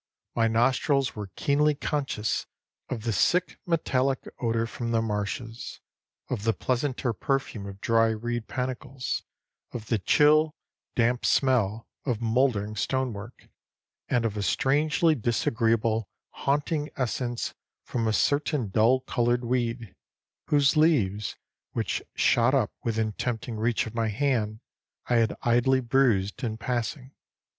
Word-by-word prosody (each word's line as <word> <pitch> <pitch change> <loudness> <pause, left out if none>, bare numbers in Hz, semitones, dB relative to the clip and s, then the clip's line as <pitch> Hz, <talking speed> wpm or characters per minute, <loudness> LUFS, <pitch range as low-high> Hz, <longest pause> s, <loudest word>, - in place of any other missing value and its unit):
My 115 -1 +2
nostrils 130 +4 +2
were 105 -2 -6
keenly 150 +1 +2
conscious 135 -7 -2 0.4
of 115 -4 -4
the 115 -1 0
sick 180 - +2
metallic 135 -5 0
odor 115 -1 0
from 115 +1 -5
the 115 -1 +2
marshes, 110 +1 -4 0.5
of 115 -5 -3
the 115 0 +2
pleasanter 130 0 -1
perfume 120 -5 -2
of 100 0 -9
dry 115 0 +3
reed 115 +1 -2
panicles, 130 0 -3 0.5
of 110 -3 -6
the 115 - +2
chill, 150 +8 +4 0.4
damp 120 +1 +2
smell 115 -5 +2 0.2
of 120 -6 -1
mouldering 115 -3 +1
stone 130 +3 -1
work, 105 +4 -10 0.6
and 120 -2 +2
of 110 -2 -1
a 105 - -2
strangely 150 - +2
disagreeable 115 -3 +1 0.2
haunting 150 +2 -1
essence 120 -1 -2 0.3
from 115 -2 -2
a - - +2
certain 145 -3 +1
dull 115 +6 +3
colored 120 0 0
weed, 120 -3 -2 0.5
whose 145 +1 +4
leaves, 110 - +2 0.4
which - - -1
shot 120 +3 +3
up 120 -7 +1
within 110 -1 0
tempting 115 +2 -3
reach 115 +3 0
of 110 - -7
my 115 -1 0
hand, 110 -2 0 0.4
I 120 - +2
had 115 -1 +1
idly 120 +2 +3
bruised 120 -4 +1
in 110 -2 -2
passing. 125 +2 -3
120 Hz, 130 wpm, -27 LUFS, 110-135 Hz, 0.6 s, chill